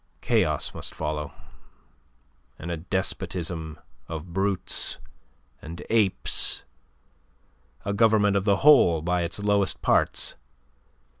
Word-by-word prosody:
Chaos - - +1
must - - -6
follow, 75 -1 -3 1.3
and 85 - -6
a 85 - -2
despotism 85 -2 -3 0.3
of 80 +1 -7
brutes 95 0 -1 0.6
and 85 +2 -8
apes, 110 -4 +1 1.2
a 100 - -1
government 105 -2 +4
of 100 - +2
the 100 -1 +3
whole 90 - +6
by 90 +1 +1
its 85 -1 -2
lowest 100 -2 0
parts. - - +2
90 Hz, 100 wpm, -26 LUFS, 85-100 Hz, 1.3 s, whole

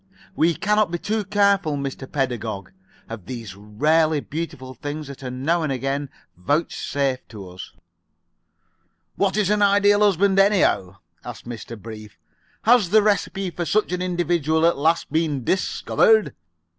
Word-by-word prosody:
We 165 -1 +2
cannot 210 -1 +1
be 175 - -2
too 215 +4 -2
careful, 195 -5 +2
Mr. 135 -1 -6
Pedagog, 115 -8 -3 0.4
of 110 -5 -9
these 115 -6 -7
rarely 150 +10 +1
beautiful 145 -4 -6
things 145 +4 -6
that 140 -1 -10
are 130 - -5
now 140 +7 0
and 155 -3 -1
again 135 +2 -2 0.3
vouchsafed 140 - -2
to 100 -4 -9
us." 90 0 -10 1.4
"What 200 0 0
is 205 -2 +2
an 210 0 +2
Ideal 205 0 +4
Husband, 200 -1 +3
anyhow?" 185 - +2 0.3
asked 120 -1 -9
Mr. 115 -1 -8
Brief. 110 -1 -10 0.5
"Has 225 -5 +4
the 215 +2 +5
recipe 195 -2 0
for 175 - -4
such 210 +3 0
an 180 0 -2
individual 170 -3 +1
at 170 - +4
last 160 +2 0
been 155 -4 0
discovered?" 215 - +2
155 Hz, 145 wpm, -22 LUFS, 130-195 Hz, 1.4 s, the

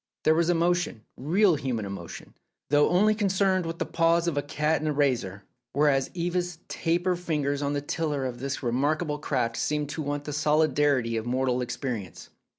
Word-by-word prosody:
There 155 - +5
was 165 +1 +2
emotion, 175 -8 +1
real 180 +8 +3
human 125 -6 -2
emotion, 100 -4 -8 0.4
though 145 0 +5
only 210 +4 +4
concerned 195 -3 +1
with 165 0 -4
the - - -2
paws 170 +1 +2
of 170 - 0
a 145 - +1
cat 150 +2 0
and 155 - -2
a - - +2
razor, 125 -9 0 0.3
whereas 140 -2 +2
Eva's 175 0 -2
taper 175 +2 0
fingers 150 -5 -1
on 145 0 -1
the 145 - -1
tiller 145 -2 -2
of 125 -2 -4
this 135 +1 -4
remarkable 150 +5 0
craft 125 -6 -1
seemed 150 -1 -1
to 155 - -4
want 145 0 -3
the 150 - -5
solidity 145 -5 +2
of 110 +1 -4
mortal 125 0 0
experience. 120 -5 -5
150 Hz, 175 wpm, -27 LUFS, 130-170 Hz, 0.4 s, There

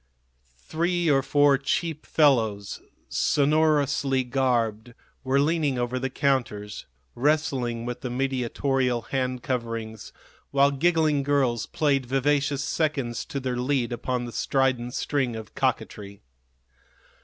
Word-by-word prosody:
Three 170 0 +1
or 135 -1 +4
four 140 0 +3
cheap 155 +3 -2
fellows, 110 -9 +2 0.3
sonorously 145 -2 +2
garbed, 120 -3 -1 0.3
were 135 +1 +2
leaning 150 -2 +1
over 120 +1 -1
the 130 +1 -2
counters, 120 -7 -1 0.3
wrestling 130 -4 0
with 125 0 -5
the 125 - -4
mediatorial 130 -1 -1
hand 130 -2 -2
coverings, 115 -4 -4 0.4
while 140 0 +3
giggling 155 0 +2
girls 135 -5 +1
played 140 -4 0
vivacious 140 +1 +1
seconds 140 -8 -1
to 140 - -4
their 130 -2 -3
lead 125 -1 0
upon 120 +1 -2
the 120 - -7
strident 130 -2 0
string 135 -5 -1
of 110 -1 -9
coquetry. 100 -4 -3
135 Hz, 115 wpm, -25 LUFS, 120-145 Hz, 0.4 s, or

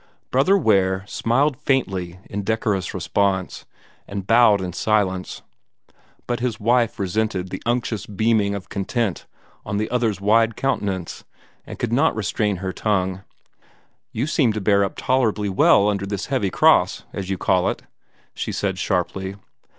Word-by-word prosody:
Brother 160 +10 +4
Ware 95 - +2
smiled 130 +6 0
faintly 95 -10 -1
in 100 - -4
decorous 105 -3 -1
response, 95 +1 -1 0.4
and 100 -1 -5
bowed 115 -2 +5
in 90 -2 -4
silence; 95 -2 -1 0.8
but 120 -1 -2
his 120 -3 -2
wife 120 +2 +2
resented 100 -2 -2
the 95 - -5
unctuous 120 -3 -1
beaming 105 0 +1
of 100 - -7
content 100 +1 -2 0.4
on 100 - -3
the 110 +2 -2
other's 115 -5 0
wide 115 +3 +3
countenance, 100 -10 -2 0.4
and - - -8
could - - -2
not - - +3
restrain 105 -1 -1
her 95 0 -4
tongue. 95 -3 -1 0.9
"You 120 - -2
seem 145 -6 +2
to 110 - -2
bear 100 0 +3
up 100 - -3
tolerably 110 -5 +1
well 100 +1 +4
under 100 -1 -1
this 100 0 -3
heavy 110 -7 +1
cross, - - +3
as 95 -1 -5
you 95 - -1
call 90 0 +2
it," - - -5 0.5
she - - -4
said 95 -2 -2
sharply. 95 +1 -2
100 Hz, 150 wpm, -22 LUFS, 95-115 Hz, 0.9 s, bowed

